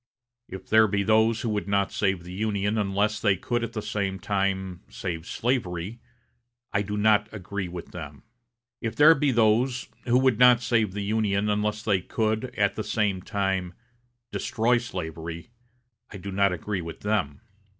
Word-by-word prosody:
If 95 -1 -9
there 110 0 +5
be 100 0 0
those 110 +2 +3
who 115 - -2
would 105 -2 -2
not 100 -1 +1
save 95 -4 0
the 90 +1 -9
Union 105 +1 -1
unless 105 +1 0
they 100 -3 +2
could 120 +5 -2
at 115 0 -4
the 110 - -4
same 100 -2 -2
time 95 -2 -1
save 85 -2 -5
slavery, 110 -4 -2 0.7
I 100 - +2
do 105 +1 -3
not 105 0 +3
agree 100 -2 -5
with 85 0 -8
them. 75 -5 -9 0.6
If 115 -2 -3
there 150 +2 +8
be 140 -2 +1
those 120 +3 +2 0.2
who 125 0 +3
would 130 -3 +3
not 125 -1 +7
save 115 -5 +1
the 100 0 -3
Union 105 -1 0
unless 105 +1 -1
they 100 -4 +2
could, 110 +4 -1
at 100 -1 +2
the 110 - -4
same 100 -5 0
time, 95 -2 -2 0.6
destroy 120 +2 +1
slavery, 85 -3 -6 0.6
I 100 - -8
do 100 +1 -7
not 100 0 +3
agree 95 +3 -3
with 85 -1 -8
them. 100 -10 -1
105 Hz, 170 wpm, -26 LUFS, 95-110 Hz, 0.7 s, there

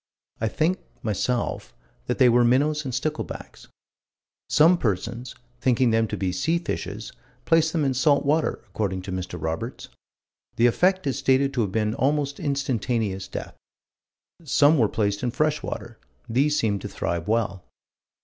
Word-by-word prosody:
I 110 - 0
think, 160 - 0 0.2
myself, 120 +3 -2 0.3
that 125 - -1
they 130 - +6
were 120 0 +5
minnows 145 +5 +2
and 130 - -3
sticklebacks. 150 +5 -4 0.8
Some 170 +4 +5
persons, 115 +4 -2 0.2
thinking 125 -1 +3
them 115 0 +2
to - - -4
be 95 -2 -1
sea 160 - +1
fishes, 170 - -5 0.3
placed 160 -1 +3
them 160 -4 0
in 135 - +1
salt 140 +2 +3
water, 155 +3 +1
according 95 -2 -2
to 95 - -6
Mr. 90 -1 -4
Roberts. 80 +1 -4 0.7
"The 115 - +3
effect 185 +10 +3
is 135 0 -1
stated 135 0 +2
to 125 - +1
have 100 -4 -1
been 110 +1 0
almost 140 +2 0
instantaneous 120 - -1
death." - - -6 0.9
"Some 145 +1 +4
were 110 -3 +3
placed 100 -2 -1
in 125 - 0
fresh 150 +4 0
water. - - -6 0.3
These 140 +6 +2
seemed 100 -3 0
to - - -5
thrive 85 -1 -3
well." 105 -4 0
125 Hz, 155 wpm, -25 LUFS, 105-145 Hz, 0.9 s, they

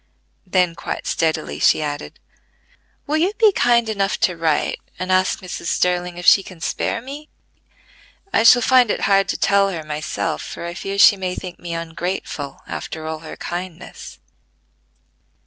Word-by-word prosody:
Then 180 -2 +2
quite - - -5
steadily 160 -1 -1
she - - +4
added: 145 0 -5 0.9
"Will 305 +1 0
you 360 +6 +1
be 435 -2 +5
kind 235 - +3
enough 200 -2 -1
to 180 - +2
write, 165 -2 0 0.2
and 185 0 -3
ask 185 0 +2
Mrs. 180 -2 -6
Sterling 180 -1 0
if 175 - -7
she 195 - +7
can 185 -3 -12
spare 230 +7 -2
me? 290 +4 -9 1.0
I - - +4
shall 240 +1 +7
find 255 -2 +5
it - - -1
hard 195 -1 +3
to - - -1
tell 200 0 +3
her 165 -4 -5
myself, 155 +1 -3
for - - -7
I 170 - -5
fear 195 +2 -5
she 200 0 +7
may 185 -1 -3
think 185 -2 -8
me 170 -1 -5
ungrateful 165 -3 -5
after 160 -1 -6
all 160 0 -4
her 160 - -10
kindness." 175 -1 -7
180 Hz, 165 wpm, -20 LUFS, 165-200 Hz, 1.0 s, she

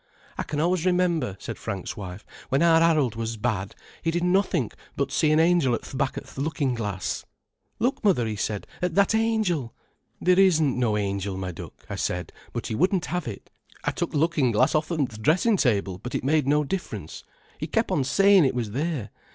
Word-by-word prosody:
"I - - -3
can 150 - -3
always 175 +1 +1
remember," 175 - +1
said - - -6
Frank's 100 -4 -4
wife, 95 0 -8 0.2
"when 135 +5 +2
our 165 -1 +5
Harold 155 -8 +3
was 115 0 -4
bad, 105 -4 -2 0.3
he 165 - 0
did 170 +1 0
nothink 180 - +1 0.2
but 140 - -1
see 155 - +2
an 155 - +4
angel 165 -7 +4
at - - -6
th' - - -9
back 135 0 -1
o' - - -3
th' - - -11
lookin' 145 -3 0
glass. 105 -5 -3 0.5
'Look, 245 +4 0
mother,' 185 - +3
'e 110 -1 -2
said, 105 0 -3 0.2
'at 180 -2 -1
that 200 +2 +4
angel!' 215 - 0 0.4
'Theer 180 +1 +3
isn't 160 -8 +4
no 110 -4 +2
angel, 100 -1 -2
my 95 -1 -3
duck,' 85 - -11
I - - -5
said, - - -2 0.2
but - - -4
he - - -3
wouldn't 180 - +2
have 180 -4 -2
it. 105 -4 -8 0.3
I - - +1
took - - -2
th' - - -8
lookin' 150 -3 +2
glass 130 +7 +3
off'n 155 -1 +1
th' 110 -3 -10
dressin' 180 - +3
table, 100 - +1
but 125 - -6
it - - -2
made 145 0 +2
no 150 +1 +3
difference. 115 - -5 0.4
He - - -3
kep' - - 0
on 135 - +2
sayin' 195 +6 +5
it 130 - +1
was 115 -4 -2
there. 135 -4 -2
145 Hz, 210 wpm, -25 LUFS, 110-175 Hz, 0.5 s, our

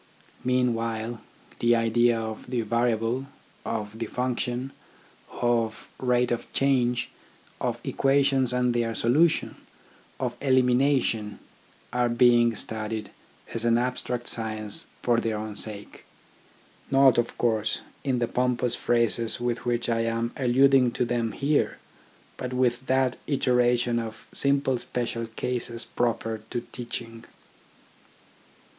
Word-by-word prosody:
Meanwhile, 115 -2 0 0.4
the 120 0 +4
idea 115 +1 +3
of 110 +1 -6
the 125 -2 0
variable, 115 +3 0 0.4
of 110 -1 -4
the 115 - -2
function, 125 +1 -2 0.6
of 115 -2 -1
rate 125 -1 +2
of 120 - -3
change, 125 -3 +1 0.5
of - - -2
equations 135 -2 +2
and 125 -1 +1
their 115 -1 0
solution, 150 +10 +2 0.6
of - - -2
elimination, 130 -4 +2 0.6
are 120 0 +2
being 120 -1 +4
studied 110 0 -5 0.4
as 115 - -2
an 115 0 +4
abstract 125 0 -2
science 110 -2 -1 0.2
for 120 -1 +3
their 115 -2 -1
own 105 -1 -5
sake. 105 -1 -1 0.9
Not, 135 -3 +5
of 120 - -2
course, 110 -2 0 0.2
in 130 -3 0
the 120 -1 0
pompous 125 0 0
phrases 115 -2 0
with 120 0 -2
which 120 -1 0
I 115 -1 +1
am 115 +1 -1
alluding 130 -1 +4
to 125 - 0
them 120 -2 -1
here, 145 +1 +1 0.6
but 125 0 -4
with 125 0 0
that 130 -1 +2
iteration 125 -3 +2
of 110 -1 -7
simple 140 -2 +1
special 120 -1 -3
cases 120 0 -3
proper 115 -2 -1
to 120 - -2
teaching. 115 -2 -6
120 Hz, 120 wpm, -26 LUFS, 115-125 Hz, 0.9 s, Not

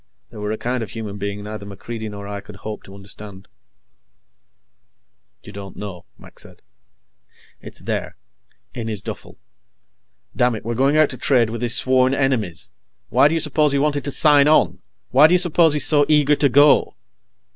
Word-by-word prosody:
They 115 - -12
were 105 0 -4
a 110 - -3
kind 125 +2 -3
of 110 - -6
human 105 -2 -7
being 100 +1 -5
neither 105 0 -7
MacReidie 110 +3 -8
nor 100 -1 -9
I 100 0 -6
could 105 - -13
hope 105 +2 -8
to 95 - -13
understand. 100 0 -12 2.0
"You - - -11
don't 100 -1 -10
know," 95 -4 -8
Mac - - -14
said. - - -10 1.0
"It's - - -11
there. - - -4 0.6
In 115 -2 -6
his 105 -3 -5
duffel. - - -9 1.0
Damn 125 -1 +1
it, 110 - -9
we're 120 - -2
going 135 +5 +1
out 155 -2 +3
to 130 - -7
trade 120 -3 +1
with 115 - -6
his 120 -1 +1
sworn 130 0 +2
enemies! 125 -11 -1 0.4
Why - - +4
do 160 - -1
you - - 0
suppose 150 -1 +2
he - - +1
wanted 145 0 0
to 140 - -2
sign 145 0 +4
on? 155 - +3 0.3
Why 140 +5 +7
do 175 - +3
you - - +5
suppose 170 -3 +3
he's 150 - 0
so 145 -2 +3
eager 150 -1 +4
to 140 -1 +2
go!" 145 +3 +4
120 Hz, 185 wpm, -20 LUFS, 105-145 Hz, 2.0 s, Why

